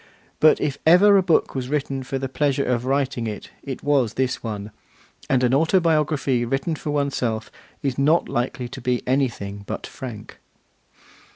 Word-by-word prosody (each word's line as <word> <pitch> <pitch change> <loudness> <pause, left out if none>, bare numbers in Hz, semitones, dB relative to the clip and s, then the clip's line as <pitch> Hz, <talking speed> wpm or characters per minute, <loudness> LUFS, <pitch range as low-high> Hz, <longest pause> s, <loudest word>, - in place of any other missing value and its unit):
But 155 - +5
if 140 -1 -2
ever 190 +5 +7
a 195 - +6
book 175 -3 +2
was 130 -2 -4
written 140 -2 -1
for 135 +1 -4
the 135 0 -3
pleasure 140 +1 0
of 125 -1 0
writing 135 -3 0
it, 105 -1 -7
it 135 -2 -7
was 135 -6 +2
this 130 -1 -1
one; 105 -2 -5 0.6
and 130 -2 +2
an 125 0 +3
autobiography 155 -5 +2
written 135 +7 -1
for 150 - -6
oneself 135 -6 -1 0.3
is 135 -2 -1
not 155 +5 +3
likely 125 +1 -2
to 130 - -9
be 125 0 0
anything 115 -7 -1
but - - -4
frank. 115 -5 -9
135 Hz, 165 wpm, -23 LUFS, 125-145 Hz, 0.6 s, ever